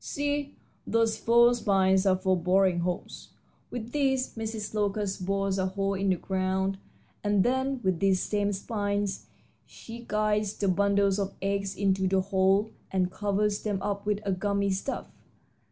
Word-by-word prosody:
See, 285 0 -2 0.3
those 230 -1 +1
four 235 +1 +5
spines 195 -4 +2
are 190 - +5
for 190 0 +1
boring 180 +1 +2
holes. 175 +1 -4 0.4
With 240 -1 -6
these 265 -2 0
Mrs. 220 -2 -5
Locust 205 -3 -1
bores 195 0 0
a 190 - +1
hole 195 +1 -1
in 195 0 0
the 185 - +3
ground, 190 +1 -1 0.4
and 205 -2 +3
then 260 +1 0
with 185 -3 +1
these 195 0 +3
same 205 +1 0
spines 205 0 -2 0.4
she 230 +1 -11
guides 210 -1 0
the 200 - 0
bundles 200 +1 +2
of 195 -1 -3
eggs 195 0 -2
into 190 -1 +1
the 190 0 +2
hole 195 +2 +2 0.2
and 185 -1 0
covers 205 0 0
them 205 -3 -2
up 200 0 -3
with 210 0 0
a 200 - 0
gummy 200 +1 0
stuff. 195 +8 -3
200 Hz, 155 wpm, -28 LUFS, 190-215 Hz, 0.4 s, four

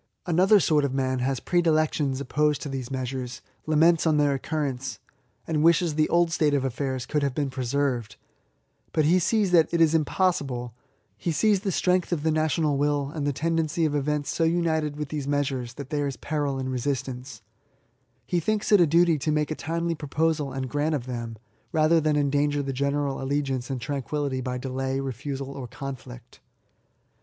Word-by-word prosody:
Another 185 +4 +5
sort 155 -5 +3
of 135 -1 -1
man 130 -1 0
has 130 0 0
predilections 155 -5 +1
opposed 150 +2 +1
to 145 - -5
these 130 -2 -4
measures, 130 -1 -4 0.2
laments 160 +2 +4
their 150 -3 +3
occurrence, 135 -2 -3 0.5
and 155 -2 0
wishes 165 0 +4
the 155 0 +1
old 170 -1 +3
state 150 -3 +2
of 135 -1 0
affairs 130 0 -2
could 150 - -1
have 140 -2 -1
been 140 -3 -1
preserved; 130 -3 -1 0.8
but 155 - +2
he 175 +4 +4
sees 205 +1 +1
that 165 -3 +4
it 170 - +1
is 165 -1 +5
impossible, 145 - 0 0.2
— - - -43
he 170 - -2
sees 205 +6 +3
the 195 0 -2
strength 180 +1 +1
of 160 -4 -1
the 160 - +2
national 155 -2 +1
will, 145 -1 0
and 145 -3 -2
the - - +2
tendency 165 +2 0
of 150 - 0
events 145 0 -1
so 165 - 0
united 160 -3 +1
with 150 -1 -5
these 145 -3 -4
measures, 135 -4 -1
that 140 -2 -8
there 145 -1 0
is 135 - -5
peril 145 -3 -2
in 130 0 -3
resist 130 +1 -1
anccr 125 -2 -8 0.8
He 175 - 0
thinks 215 +5 -1
it 205 -3 +7
a 170 - +5
duty 165 0 +4
to 155 +3 -1
make 150 0 0
a - - -1
timely 170 +2 -2
proposal 150 -1 -1
and 130 0 -3
grant 145 +4 0
of 125 -4 -4
them, 120 -3 -5 0.3
rather 160 0 +3
than 155 -1 +1
endanger 145 0 +1
the 135 0 -3
general 140 +1 -1
allegiance 135 -2 -1
and 135 -2 -2
tranquillity 140 +1 -2
by 125 0 -3
delay, 130 +1 -2
refusal, 135 +1 -4
or 135 -3 -7
conflict. 125 -1 -9
145 Hz, 185 wpm, -26 LUFS, 135-160 Hz, 0.8 s, it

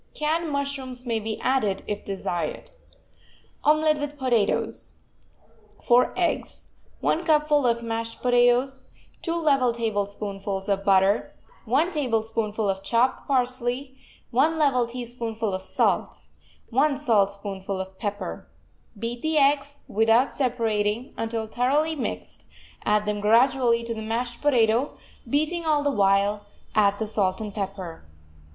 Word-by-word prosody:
Canned 320 +2 0
mushrooms 275 -3 -3
may 230 -2 0
be 220 0 -4
added, 215 -7 0
if 205 0 -4
desired. 190 - -4 0.9
OMELET 310 0 +3
WITH 290 0 -5
POTATOES 240 -6 0 0.9
4 245 0 +4
eggs 350 -2 -2 0.3
1 335 - +1
cupful 300 -4 +3
of 235 0 +1
mashed 230 0 -3
potatoes 245 +2 +3 0.3
2 335 -1 -1
level 280 -7 +3
tablespoonfuls 205 -3 -3
of 195 -1 0
butter 195 +1 +3 0.3
1 280 +10 +2
tablespoonful 225 - -1
of 190 -1 -1
chopped 235 +5 +1
parsley 255 0 -1 0.4
1 300 +7 +3
level 260 -6 +2
teaspoonful 230 -3 -4
of 185 - -2
salt 190 - 0 0.5
1 275 +4 +2
saltspoonful 200 -6 0
of 190 0 -7
pepper 205 -2 -4 0.5
Beat 235 +3 -4
the 315 0 0
eggs, 285 0 +2
without 225 +4 +3
separating, 230 -3 0
until 225 0 -3
thoroughly 275 +8 +1
mixed; 85 - -5 0.4
add 210 0 +3
them 210 0 -1
gradually 235 +2 +3
to 230 0 -3
the 220 - -6
mashed 235 +2 -3
potato, 245 -2 +2 0.3
beating 310 +6 +1
all 305 -2 +2
the 285 - +2
while; 200 -1 +2 0.3
add 205 -2 +3
the 220 - -2
salt 200 -3 0
and 210 -2 -5
pepper. 195 -5 -5
235 Hz, 125 wpm, -25 LUFS, 210-275 Hz, 0.9 s, 4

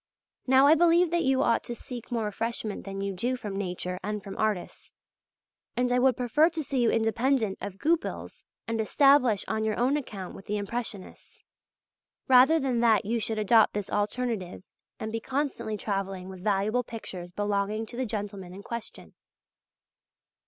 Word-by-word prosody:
Now 265 +1 +6
I 295 - +8
believe 340 +1 +4
that 345 0 +2
you 265 0 +3
ought 230 - +2
to 240 - -5
seek 245 0 -9
more 230 -2 0
refreshment 215 0 -3
than 195 0 -5
you 200 0 -2
do 240 +7 -1
from 210 -5 -6
Nature 180 -2 -3
and 210 0 -3
from 195 - -7
artists. 215 -5 -3 0.8
And 245 0 +1
I 250 - +3
would 255 -1 +3
prefer 265 +6 +3
to 325 -2 -4
see 270 -2 -1
you 235 - +4
independent 225 -1 +1
of 200 -1 -6
Goupil's 330 - -2 0.2
and 225 0 -1
established 255 -3 +4
on 220 0 -1
your 215 -1 -1
own 260 +5 +2
account 200 -10 -6
with 195 - -12
the 210 0 -1
Impressionists, 205 -1 -5 0.8
rather 265 +5 +6
than 260 -4 0
that 225 -4 +4
you 230 +3 0
should 220 0 -2
adopt 215 +1 +4
this 205 -2 -3
alternative 210 -3 -2 0.4
and 220 - -4
be 225 - -2
constantly 260 -4 -2
travelling 195 -2 -3
with 185 -1 -10
valuable 210 +4 +1
pictures 185 -6 -7
belonging 205 +2 -1
to 235 - -10
the 255 0 -2
gentlemen 200 -4 -5
in 200 - -10
question. 235 +1 -7
220 Hz, 170 wpm, -28 LUFS, 200-250 Hz, 0.8 s, I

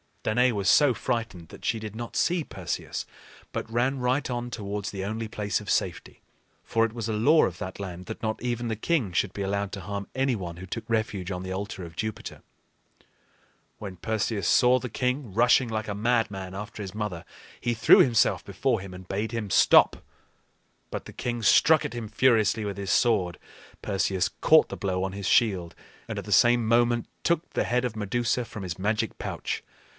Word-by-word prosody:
Danaë 125 +4 +3
was 100 -3 0
so 145 -4 +5
frightened 110 -9 -3
that - - -11
she 115 - 0
did 110 -1 -7
not 120 +1 -6
see 175 -1 +1
Perseus, - - -5 0.4
but 115 - -5
ran 130 +4 +1
right 125 +3 0
on 120 0 -3
towards 100 -2 -4
the 95 -1 -5
only 110 +3 -3
place 105 -2 -2
of - - -9
safety. - - -2 0.4
For 115 0 +2
it 110 - -5
was 115 -2 -4
a - - 0
law 145 +10 +5
of 90 - -4
that 95 +1 -6
land 90 -2 -6
that 110 - -7
not 110 -1 -2
even 120 0 -2
the 110 - -1
king 115 - 0
should 95 +2 0
be 100 - -5
allowed 100 0 -1
to 95 - -5
harm 100 +1 -5
any 135 -1 +1
one 85 -5 -6
who 95 - -8
took 115 +2 -6
refuge 110 -5 -1
on 90 -1 -3
the 95 - -5
altar 95 -1 -5
of 85 -1 -10
Jupiter. 110 +3 -5 1.4
When 100 -3 -7
Perseus 105 0 -2
saw 125 0 +5
the 125 0 -5
king 125 -1 -2
rushing 120 +2 +4
like 110 0 -3
a 100 - -3
madman 105 -4 0
after 105 +2 -7
his 95 0 -8
mother, 105 -6 -4 0.4
he 120 - 0
threw 115 +1 +7
himself 115 -4 +3
before 110 +4 0
him 95 -1 -9
and 90 0 -11
bade 105 +3 -2
him 115 -3 -3
stop. - - +5 0.9
But - - -5
the - - -10
king 120 -1 -3
struck 155 +8 +5
at - - -4
him 120 -2 -5
furiously 110 -1 +3
with 100 -2 -4
his 100 -2 -3
sword. 100 -8 +2 0.4
Perseus 95 -2 0
caught - - +4
the - - -6
blow 95 -2 -1
on 95 0 -3
his 100 0 -4
shield, 95 -6 +2 0.3
and - - -4
at - - -8
the - - -7
same 120 -1 +5
moment 120 0 +2 0.2
took 170 0 0
the - - 0
head 125 +1 +1
of 120 -3 -3
Medusa 120 +3 -1
from 110 - -8
his 90 -2 -5
magic 105 +3 -1
pouch. - - -4
110 Hz, 200 wpm, -27 LUFS, 100-120 Hz, 1.4 s, threw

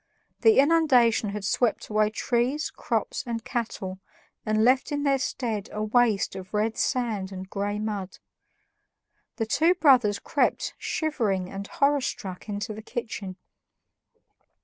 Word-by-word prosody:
The 445 -1 +5
inundation 270 -8 +4
had 205 0 -5
swept 240 +4 +1
away 215 0 +2
trees, 245 +6 -1
crops, - - -2
and 230 -1 -4
cattle, 190 -5 -4 0.5
and 215 0 +2
left 260 +4 +3
in 290 0 -1
their 275 -1 +2
stead 225 -6 -3
a 210 - -3
waste 220 -2 +2
of 190 +2 -7
red 215 +2 +1
sand 220 -6 -1
and 190 0 -7
gray 205 +1 -2
mud. 205 -3 -4 1.2
The 225 - -1
two 325 +10 +3
brothers 250 - +4
crept - - 0
shivering 215 - -1
and 200 0 -6
horror 285 0 +2
struck 190 -4 -5
into 205 +1 -3
the 215 - -8
kitchen. 215 -5 -5
220 Hz, 135 wpm, -26 LUFS, 205-255 Hz, 1.2 s, The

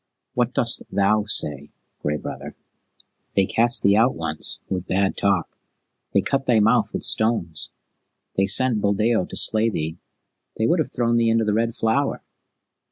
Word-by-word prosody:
"What - - -1
dost - - +1
thou 105 +1 +1
say, 75 -8 +1 0.3
Gray 75 +1 -1
Brother?" - - -8 0.8
"They 95 - +3
cast 120 +4 +2
thee 100 0 +4
out 115 +4 +3
once, 80 -2 -2
with 95 -1 -4
bad 95 +1 0
talk. 100 -4 -1 0.5
They 100 - +3
cut 135 +7 -1
thy 120 -3 +4
mouth 110 +2 +2
with - - -5
stones. 110 -8 -1 0.6
They 95 0 +1
sent 110 +2 +3
Buldeo 105 0 +1
to - - -9
slay 110 +1 +3
thee. 80 -4 -4 0.6
They 110 - 0
would 170 +8 +2
have 155 - -1
thrown 120 -1 0
thee 115 -1 +2
into 115 0 +2
the 105 - 0
Red 115 +1 0
Flower. 135 +6 -1
110 Hz, 165 wpm, -22 LUFS, 95-115 Hz, 0.8 s, thee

